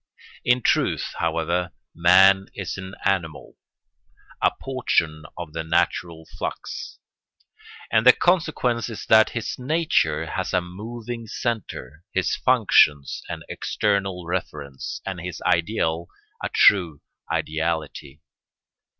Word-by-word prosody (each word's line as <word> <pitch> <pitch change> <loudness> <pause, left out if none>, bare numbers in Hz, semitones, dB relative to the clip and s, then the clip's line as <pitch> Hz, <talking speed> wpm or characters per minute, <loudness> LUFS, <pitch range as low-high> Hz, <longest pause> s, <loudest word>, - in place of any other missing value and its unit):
In 125 0 +2
truth, - - +1
however, 90 0 -1 0.2
man 95 +3 +5
is 95 -3 -4
an 95 0 -8
animal, 90 -6 -1 0.9
a - - +5
portion 85 -12 -1
of 85 -3 -7
the 80 - -3
natural 80 0 -1
flux; - - -5 0.9
and 110 - +4
the 125 - +10
consequence 145 -10 +1
is 115 - -7
that 110 0 +6
his 115 - -4
nature 125 - +1
has - - -4
a 90 - +4
moving 115 +6 -7
centre, 90 - -4
his - - 0
functions 75 -2 +3
an - - -5
external 95 -4 -1
reference, 75 -6 -5
and 95 -3 -4
his 90 0 -6
ideal 85 -2 0 0.4
a - - -1
true 85 -7 +4 0.3
ideality. 80 -2 -3
90 Hz, 110 wpm, -23 LUFS, 80-110 Hz, 0.9 s, the